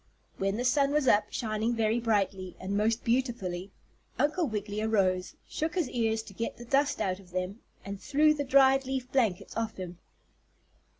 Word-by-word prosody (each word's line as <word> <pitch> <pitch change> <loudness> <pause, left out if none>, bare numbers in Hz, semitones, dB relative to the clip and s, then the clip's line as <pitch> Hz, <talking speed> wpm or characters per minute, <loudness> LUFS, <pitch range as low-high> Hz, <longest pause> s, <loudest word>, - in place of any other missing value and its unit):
When 195 +2 0
the 245 - -1
sun 275 +2 +3
was 300 -3 +2
up, 210 -3 +5
shining 220 0 -1
very 225 +1 +1
brightly, 195 -5 0
and 190 +2 -3
most 220 +2 +1
beautifully, 230 -7 -1 0.5
Uncle 310 +3 +1
Wiggily 210 -2 -3
arose, 190 -4 +1
shook 315 +3 -3
his 340 -8 0
ears 225 -2 0
to 200 - -12
get 230 +4 -4
the 240 - -9
dust 280 +4 +2
out 185 0 -1
of 190 -2 -16
them, 185 +4 -3 0.3
and 200 0 -6
threw 305 +2 +4
the 290 -1 -2
dried 270 0 +5
leaf 260 -1 -3
blankets 225 -9 0
off 225 -1 -2
him. 180 -2 -7
225 Hz, 175 wpm, -29 LUFS, 195-265 Hz, 0.5 s, up